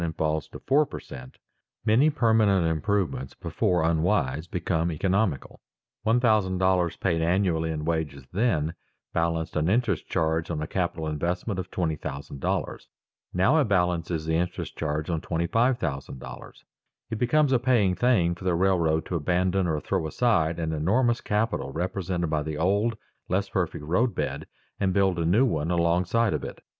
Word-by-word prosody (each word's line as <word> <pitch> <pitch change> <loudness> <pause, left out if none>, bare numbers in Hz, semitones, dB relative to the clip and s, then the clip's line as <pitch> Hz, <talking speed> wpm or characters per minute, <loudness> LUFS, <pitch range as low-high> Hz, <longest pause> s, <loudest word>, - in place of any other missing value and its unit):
and 80 -1 -3
falls 80 -1 0
to - - -10
four 145 +3 +3
per - - -7
cent. 65 0 -11 0.5
many 120 +8 +5
permanent 110 - +3
improvements 80 -4 -1
before 90 -2 0
unwise 80 -2 +1
become 85 -1 -1
economical. 95 - -1 0.4
One 115 +2 +2
thousand 105 -6 +2
dollars 90 -2 +2
paid 85 -4 0
annually 85 -1 +1
in 75 -1 -3
wages 80 -5 -2
then 90 -7 +1 0.4
balanced 85 -1 -1
an 75 +3 +1
interest 110 -4 +1
charge 80 0 0
on 80 -3 -2
a 75 - -2
capital 85 -2 -2
investment 90 +6 -2
of 90 0 -5
$20,000; 75 -5 -3 0.4
now 125 - +3
it - - +2
balances 90 -5 0
the 80 - -1
interest 90 +2 -2
charge 75 0 -2
on 80 -2 -1
$25,000. 80 - -2 0.6
It 110 - -3
becomes 140 +4 +3
a 130 - +4
paying 120 -7 +3
thing 90 -4 +2
for 90 - -11
the 90 -2 +1
railroad 85 -4 +2
to 90 - -4
abandon 90 +3 +1
or 80 -2 0
throw 80 - -1
aside 85 -5 +1
an 80 -1 -2
enormous 115 +10 +1
capital 105 +2 -1
represented 90 0 -2
by 80 -1 +1
the 75 0 -4
old, 100 +7 +1 0.3
less 95 +2 0
perfect 85 -5 -2
roadbed, 110 +10 -1 0.3
and 95 -2 +1
build 95 -3 +2
a 85 - 0
new 105 +11 +4
one 80 - -1
alongside 90 +5 +2
of 75 - -2
it. - - -8
90 Hz, 155 wpm, -26 LUFS, 80-100 Hz, 0.6 s, many